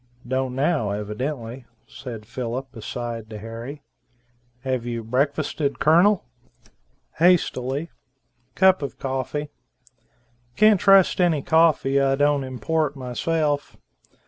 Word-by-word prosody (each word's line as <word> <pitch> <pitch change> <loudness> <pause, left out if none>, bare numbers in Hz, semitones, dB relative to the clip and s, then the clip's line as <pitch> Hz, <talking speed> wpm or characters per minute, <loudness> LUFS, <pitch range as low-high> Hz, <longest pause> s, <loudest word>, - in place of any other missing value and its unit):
"Don't 130 0 -1
now 140 -5 +1
evidently," 115 +4 -4 0.2
said 115 -5 -9
Philip 125 +2 -5
aside 115 0 -6
to 110 - -7
Harry. 115 +7 -8 0.8
"Have 130 -2 -2
you 120 -1 -4
breakfasted 140 +4 -1
Colonel?" 175 +6 +4 0.9
"Hastily. 160 -4 +2 0.6
Cup 190 -2 +4
of 140 - -5
coffee. 135 +3 -3 1.1
Can't 215 -2 +5
trust 195 -2 +5
any 160 -6 +2
coffee 155 -4 +3
I 135 0 +2
don't 145 0 +2
import 140 +4 -1
myself. 145 +3 -2
135 Hz, 100 wpm, -23 LUFS, 120-155 Hz, 1.1 s, Can't